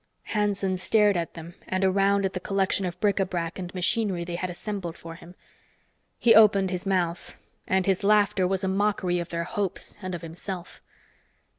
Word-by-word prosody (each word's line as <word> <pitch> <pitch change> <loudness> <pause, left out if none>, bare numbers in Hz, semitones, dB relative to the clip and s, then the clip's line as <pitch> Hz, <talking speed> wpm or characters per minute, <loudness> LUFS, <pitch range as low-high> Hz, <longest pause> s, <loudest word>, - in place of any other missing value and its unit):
Hanson 200 -3 0
stared 205 +2 +3
at 170 -1 -3
them 165 +1 -9
and 185 +1 0
around 195 +1 +2
at 190 - -2
the 185 - -3
collection 195 0 0
of 175 - -7
bric 205 -1 +1
a - - +4
brac 170 -1 -4
and 180 -1 -5
machinery 185 -1 +1
they 170 0 -6
had 180 +1 -3
assembled 180 -2 -5
for 165 0 -9
him. 170 +2 -14 0.8
He 235 - +5
opened 200 -3 +6
his 180 +1 -4
mouth, 175 -3 -1 0.3
and 190 -1 +1
his 195 0 +1
laughter 205 -2 +3
was 190 0 -1
a - - 0
mockery 190 -2 0
of 170 0 -5
their 170 0 -2
hopes 195 +3 -4
and 185 -2 -4
of 170 - -8
himself. 175 +2 -7
185 Hz, 185 wpm, -26 LUFS, 175-200 Hz, 0.8 s, opened